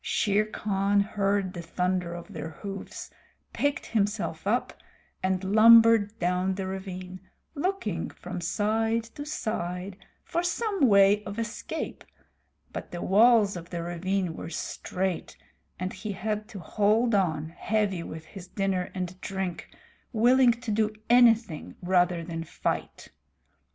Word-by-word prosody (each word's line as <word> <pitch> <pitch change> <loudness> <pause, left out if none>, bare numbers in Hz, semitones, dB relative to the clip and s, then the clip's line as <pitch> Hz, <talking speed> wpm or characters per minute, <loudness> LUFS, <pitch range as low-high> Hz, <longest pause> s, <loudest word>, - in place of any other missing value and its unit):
Shere 210 0 +1
Khan 200 -1 0
heard 200 -2 0
the 175 - -5
thunder 180 +1 -1
of 175 +4 -9
their 160 -1 -5
hoofs, 195 +6 -8 0.4
picked 285 0 0
himself 205 -5 -1
up, 240 +4 +1 0.5
and 185 0 0
lumbered 225 +1 +6
down 180 +2 0
the 195 0 -3
ravine, 185 -1 -6 0.3
looking 285 - -2
from 180 0 -7
side 225 +5 0
to 260 +6 -9
side 185 - -3 0.3
for 340 - -1
some 380 - +1
way 200 0 +5
of 200 +1 -6
escape, 230 0 -4 0.7
but - - -6
the 175 - -5
walls 215 0 +5
of 170 -1 -8
the 170 -1 -4
ravine 180 +1 -1
were - - -7
straight 180 +2 -3 0.4
and 185 +1 -3
he 205 +2 -5
had 210 +2 -3
to 205 - -10
hold 215 +6 +2
on, 160 -6 +1
heavy 195 +1 -1
with 160 -1 -8
his 185 +2 -11
dinner 190 -2 -1
and 180 -2 -3
his 185 - -18
drink, 190 -3 -4 0.4
willing 245 +2 +5
to 235 -1 -5
do 215 0 +1 0.2
anything 230 -8 +4
rather 180 -1 +2
than 165 -1 -5
fight. - - -4
195 Hz, 135 wpm, -27 LUFS, 180-220 Hz, 0.7 s, lumbered